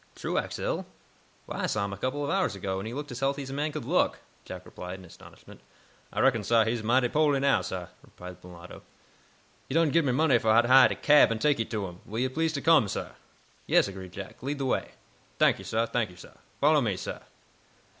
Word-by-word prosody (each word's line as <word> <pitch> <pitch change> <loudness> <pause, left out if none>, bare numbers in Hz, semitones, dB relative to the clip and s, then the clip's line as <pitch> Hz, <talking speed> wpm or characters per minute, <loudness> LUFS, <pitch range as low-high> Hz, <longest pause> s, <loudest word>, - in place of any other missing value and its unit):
"Truax - - -3
ill? - - -3 0.6
Why, - - -6
I - - 0
saw 110 -2 -1
him 100 - -5
a - - -7
couple 130 +7 -2
of 145 - -2
hours 190 - 0
ago, 95 0 -3
and 100 - -6
he 115 - -6
looked 145 -1 -6
as 125 - -6
healthy 140 +1 -1
as 135 - -8
a - - -5
man 150 +2 -1
could 150 0 -6
look," - - +1 0.3
Jack - - -9
replied, 90 +1 -8
in 95 - -13
astonishment. 85 - -15 0.5
"I - - -1
reckon, 120 -5 +3
sah, 115 +2 +4
he's 115 +1 -1
mighty 125 +3 +2
po'ly 150 +1 +2
now, 135 -7 +3
sah," 90 0 -5 0.2
replied 90 0 -12
the - - -13
mulatto. 90 0 -12 0.9
"He 130 - -3
done 165 -3 +3
gib 165 0 +3
me 130 - +2
money 135 -2 +3
fo' 110 0 +4
to 120 - +2
hiah 130 +1 +8
a - - -2
cab 150 -5 +5
an' 115 - -1
take 145 +2 +1
yo' 115 - 0
to 105 -3 -3
him. 90 -1 -9
Will 110 - -6
yo' 130 +2 +1
please 160 +4 -1
to 140 - -3
come, 160 -9 +5
sah?" - - -4 0.6
"Yes," - - +4
agreed 95 -2 -9
Jack. 100 0 -9
"Lead 140 +3 -3
the 135 - -3
way." 130 - -1 0.5
"T'ank - - +4
yo', - - -9
sah; 115 +1 0
t'ank 115 -3 -1
yo', 90 - -15
sah. 90 - -14 0.3
Follow 150 0 +4
me, 105 -7 -1
sah." - - -6
120 Hz, 240 wpm, -28 LUFS, 100-140 Hz, 0.9 s, hiah